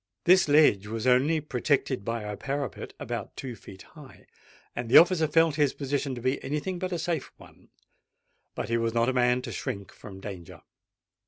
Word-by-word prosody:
This 185 0 +5
ledge 145 -10 +4
was 110 +1 -4
only 130 +6 +3
protected 140 -4 -1
by 115 +1 -3
a 105 0 -5
parapet 140 -1 -5
about - - -5
two 125 -3 -6
feet 95 -2 -13
high; 150 -4 -15 0.5
and 120 -1 -4
the - - +8
officer 170 -2 +6
felt 165 0 +3
his 145 -3 +2
position 140 -1 -2
to 120 - -8
be 130 +3 -1
any 150 +3 -2
thing 185 +3 -4
but 185 0 -3
a 175 - -1
safe 165 -2 -3
one. - - -18 0.9
But - - -4
he 115 - +1
was 115 0 -1
not 115 0 +3
the 130 - 0
man 125 0 +2
to 120 - -6
shrink 100 -3 -5
from 95 -2 -12
danger. 95 -4 -9
130 Hz, 190 wpm, -27 LUFS, 115-150 Hz, 0.9 s, the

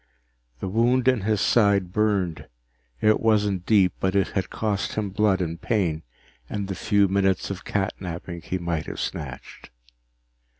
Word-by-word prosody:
The - - -2
wound 120 +5 +2
in 130 -4 +4
his 105 0 0
side 100 -5 +3
burned. 100 -6 0 0.5
It 110 0 +4
wasn't 105 -5 +1
deep, 100 -4 +4
but 95 +1 0
it 100 - +2
had 95 - -2
cost 105 -2 -2
him 105 -3 -2
blood 100 -1 +2
and 85 -1 -3
pain 90 -9 0 0.5
and 100 -2 -3
the 95 - -3
few 100 +2 +2
minutes 95 0 +1
of 100 - -6
catnapping 90 -3 -4
he 95 - -2
might 85 -3 -3
have - - -6
snatched. 65 -3 -6
100 Hz, 155 wpm, -24 LUFS, 90-105 Hz, 0.5 s, in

